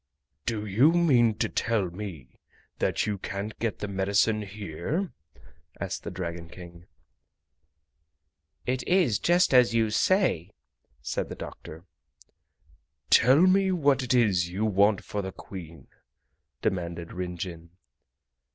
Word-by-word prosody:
"Do 110 Hz, -2 st, -1 dB
you 120 Hz, -, +4 dB
mean 125 Hz, -10 st, +4 dB
to -, -, 0 dB
tell 105 Hz, -6 st, -1 dB
me 90 Hz, -8 st, -9 dB, 0.4 s
that -, -, 0 dB
you 105 Hz, -2 st, -2 dB
can't 100 Hz, +3 st, -5 dB
get 115 Hz, -2 st, -2 dB
the 105 Hz, -, -4 dB
medicine 100 Hz, +3 st, +1 dB
here?" 105 Hz, -, -4 dB, 0.7 s
asked -, -, -4 dB
the -, -, -6 dB
Dragon 85 Hz, -2 st, -6 dB
King. 85 Hz, 0 st, -12 dB, 1.8 s
"It 130 Hz, 0 st, -1 dB
is 175 Hz, -, +3 dB
just 175 Hz, -2 st, +3 dB
as 125 Hz, -2 st, +5 dB
you 110 Hz, -2 st, +2 dB
say!" 140 Hz, -, +2 dB, 0.5 s
said -, -, -3 dB
the -, -, -6 dB
doctor. 80 Hz, +3 st, -10 dB, 1.3 s
"Tell 130 Hz, +6 st, +6 dB
me 190 Hz, +1 st, +4 dB
what 145 Hz, -7 st, +2 dB
it 125 Hz, 0 st, 0 dB
is 95 Hz, -8 st, +3 dB
you 100 Hz, +5 st, -2 dB
want 100 Hz, 0 st, +3 dB
for 105 Hz, -, -4 dB
the 95 Hz, -1 st, -5 dB
Queen?" 85 Hz, -5 st, -10 dB, 0.8 s
demanded 85 Hz, -2 st, -3 dB
Rin 90 Hz, -1 st, -4 dB
Jin. 85 Hz, -1 st, -7 dB
105 Hz, 125 wpm, -27 LUFS, 90-125 Hz, 1.8 s, Tell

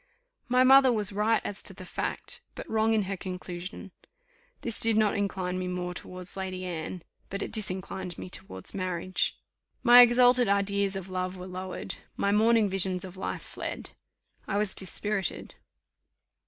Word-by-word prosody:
My 250 Hz, 0 st, +4 dB
mother 265 Hz, 0 st, +7 dB
was 210 Hz, -3 st, 0 dB
right 215 Hz, +3 st, +2 dB
as 205 Hz, -, -3 dB
to 190 Hz, -, -4 dB
the 185 Hz, -, -10 dB
fact, -, -, -4 dB
but -, -, -8 dB
wrong 220 Hz, 0 st, +2 dB
in 215 Hz, -, +2 dB
her 195 Hz, +1 st, -3 dB
conclusion. 180 Hz, +1 st, -7 dB, 0.7 s
This 230 Hz, -, 0 dB
did 225 Hz, -1 st, +4 dB
not 215 Hz, -2 st, +3 dB
incline 185 Hz, -2 st, -2 dB
me 185 Hz, -, -3 dB
more 180 Hz, 0 st, -3 dB
towards 180 Hz, 0 st, -6 dB
Lady 185 Hz, -1 st, -4 dB
Anne, 170 Hz, 0 st, -5 dB, 0.3 s
but 200 Hz, +1 st, -3 dB
it -, -, -6 dB
disinclined 190 Hz, -3 st, -3 dB
me -, -, -7 dB
towards 95 Hz, -, -6 dB
marriage. 185 Hz, -1 st, -1 dB, 0.5 s
My 245 Hz, 0 st, +10 dB
exalted 245 Hz, 0 st, +6 dB
ideas 200 Hz, 0 st, +1 dB
of 190 Hz, -1 st, -6 dB
love 185 Hz, 0 st, -3 dB
were 180 Hz, -, -8 dB
lowered 185 Hz, 0 st, -5 dB, 0.2 s
my 200 Hz, -, +1 dB
morning 220 Hz, +1 st, +4 dB
visions 190 Hz, -1 st, +2 dB
of 185 Hz, 0 st, -10 dB
life 190 Hz, -, -4 dB
fled -, -, -6 dB, 0.6 s
I 200 Hz, -, -1 dB
was 210 Hz, -2 st, 0 dB
dispirited. 195 Hz, 0 st, 0 dB
195 Hz, 160 wpm, -28 LUFS, 185-215 Hz, 0.7 s, My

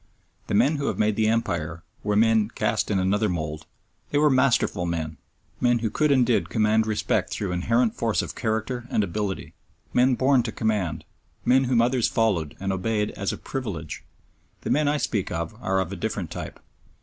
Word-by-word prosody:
The -, -, 0 dB
men 145 Hz, +8 st, +3 dB
who 140 Hz, -, -2 dB
have 110 Hz, -, -1 dB
made 105 Hz, -1 st, +2 dB
the 110 Hz, 0 st, +2 dB
Empire 85 Hz, -7 st, -1 dB, 0.2 s
were 105 Hz, 0 st, 0 dB
men 110 Hz, -1 st, +4 dB
cast 105 Hz, -1 st, -1 dB
in 100 Hz, -, +1 dB
another 100 Hz, +3 st, +1 dB
mould. 80 Hz, -2 st, -4 dB, 0.4 s
They 145 Hz, -, 0 dB
were 150 Hz, 0 st, +4 dB
masterful 120 Hz, -8 st, +2 dB
men; 80 Hz, -3 st, -3 dB, 0.4 s
men 120 Hz, -1 st, +3 dB
who 115 Hz, -2 st, -2 dB
could 150 Hz, -1 st, +2 dB
and 130 Hz, -3 st, +4 dB
did 120 Hz, -1 st, +1 dB
command 110 Hz, 0 st, +2 dB
respect 110 Hz, -1 st, 0 dB
through 100 Hz, -3 st, -3 dB
inherent 115 Hz, +6 st, +1 dB
force 115 Hz, -2 st, 0 dB
of -, -, -6 dB
character 115 Hz, +2 st, -2 dB
and 105 Hz, -, +1 dB
ability; 100 Hz, +1 st, -3 dB, 0.4 s
men 125 Hz, +1 st, +4 dB
born 130 Hz, +1 st, +4 dB
to 115 Hz, -1 st, -4 dB
command; 95 Hz, -10 st, -1 dB, 0.4 s
men 130 Hz, +2 st, +4 dB
whom 120 Hz, -2 st, +3 dB
others 125 Hz, -1 st, +2 dB
followed 95 Hz, -10 st, 0 dB
and 95 Hz, 0 st, -1 dB
obeyed 105 Hz, +2 st, -1 dB
as 100 Hz, -, -2 dB
a -, -, -5 dB
privilege. 100 Hz, -, -5 dB, 0.6 s
The -, -, -3 dB
men 150 Hz, +1 st, +2 dB
I 150 Hz, +1 st, +2 dB
speak 105 Hz, -9 st, -1 dB
of 85 Hz, +3 st, -3 dB
are 95 Hz, 0 st, +1 dB
of 95 Hz, -, -2 dB
a -, -, -4 dB
different -, -, -3 dB
type. -, -, -7 dB
110 Hz, 190 wpm, -25 LUFS, 95-120 Hz, 0.6 s, men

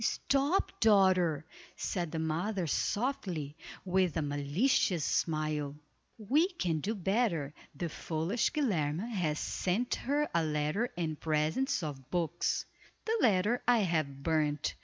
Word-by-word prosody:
"Stop, 280 Hz, -, +1 dB
daughter," 185 Hz, -7 st, +4 dB, 0.3 s
said 175 Hz, -4 st, -2 dB
the 165 Hz, -, -3 dB
mother, 170 Hz, +5 st, -1 dB
softly, 180 Hz, -, -1 dB, 0.3 s
with 185 Hz, -3 st, +1 dB
a 160 Hz, -, +1 dB
malicious 145 Hz, -, +1 dB
smile, 155 Hz, -3 st, 0 dB, 0.4 s
"we 275 Hz, -, +3 dB
can 180 Hz, -, -1 dB
do 210 Hz, +8 st, -2 dB
better. 190 Hz, -, 0 dB, 0.2 s
The 170 Hz, +4 st, -2 dB
foolish 165 Hz, +7 st, -1 dB
Guilerme 195 Hz, -, 0 dB
has 165 Hz, -8 st, 0 dB
sent 200 Hz, +11 st, -1 dB
her 290 Hz, +3 st, 0 dB
a 170 Hz, -1 st, +2 dB
letter 155 Hz, +9 st, 0 dB
and 160 Hz, -3 st, -2 dB
presents 160 Hz, -, 0 dB
of 135 Hz, -4 st, -6 dB
books. 170 Hz, -1 st, 0 dB, 0.4 s
The 450 Hz, -, +1 dB
letter 210 Hz, +3 st, +3 dB
I 240 Hz, -2 st, +5 dB
have 155 Hz, -7 st, -1 dB
burned. 150 Hz, -2 st, +1 dB
175 Hz, 125 wpm, -32 LUFS, 155-220 Hz, 0.4 s, I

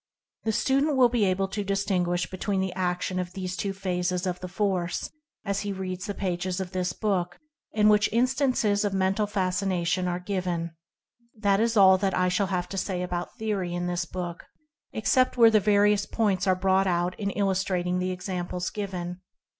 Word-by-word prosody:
The 220 Hz, -, +2 dB
student 275 Hz, +5 st, +1 dB
will 250 Hz, -2 st, +6 dB
be 235 Hz, -3 st, +2 dB
able 195 Hz, +1 st, +1 dB
to 205 Hz, +1 st, -3 dB
distinguish 185 Hz, -3 st, 0 dB
be -, -, -8 dB
tween 195 Hz, 0 st, -1 dB
the 190 Hz, -1 st, -1 dB
action 180 Hz, 0 st, -1 dB
of 180 Hz, 0 st, -4 dB
these 185 Hz, -1 st, -4 dB
two 200 Hz, +1 st, -2 dB
phases 180 Hz, -1 st, -2 dB
of 180 Hz, -1 st, -2 dB
the 180 Hz, -, -6 dB
force, 185 Hz, -2 st, -1 dB, 0.3 s
as 200 Hz, -1 st, -1 dB
he 205 Hz, 0 st, -3 dB
reads 185 Hz, -1 st, -4 dB
the 205 Hz, -, -3 dB
pages 185 Hz, -1 st, -2 dB
of 185 Hz, -1 st, -4 dB
this 180 Hz, -1 st, -1 dB
book, 180 Hz, -5 st, -1 dB, 0.4 s
in 210 Hz, -1 st, +4 dB
which 210 Hz, 0 st, +4 dB
instances 245 Hz, -3 st, +2 dB
of 200 Hz, -2 st, -1 dB
Mental 195 Hz, +2 st, +1 dB
Fascination 185 Hz, -2 st, 0 dB
are 175 Hz, 0 st, -1 dB
given. 180 Hz, -3 st, -2 dB, 0.6 s
This 200 Hz, -2 st, +2 dB
is 230 Hz, 0 st, +1 dB
all 190 Hz, -1 st, +7 dB
that 195 Hz, -2 st, 0 dB
I 180 Hz, 0 st, +2 dB
shall 195 Hz, +2 st, +1 dB
have 180 Hz, -2 st, -2 dB
to 195 Hz, -, -3 dB
say 180 Hz, -1 st, -2 dB
about 175 Hz, +3 st, -4 dB
theory 200 Hz, -6 st, -2 dB
in 175 Hz, 0 st, -2 dB
this 175 Hz, 0 st, -1 dB
book, 175 Hz, 0 st, -6 dB, 0.5 s
except 255 Hz, +4 st, +2 dB
where 230 Hz, -2 st, +7 dB
the 215 Hz, -, +5 dB
various 205 Hz, 0 st, +3 dB
points 200 Hz, -4 st, 0 dB
are 185 Hz, -, +4 dB
brought 190 Hz, +1 st, +2 dB
out 175 Hz, 0 st, +1 dB
in 200 Hz, -2 st, -1 dB
illustrating 190 Hz, -2 st, 0 dB
the 185 Hz, 0 st, -1 dB
examples 180 Hz, -1 st, -3 dB
given. 180 Hz, -3 st, -5 dB
190 Hz, 185 wpm, -26 LUFS, 180-205 Hz, 0.6 s, all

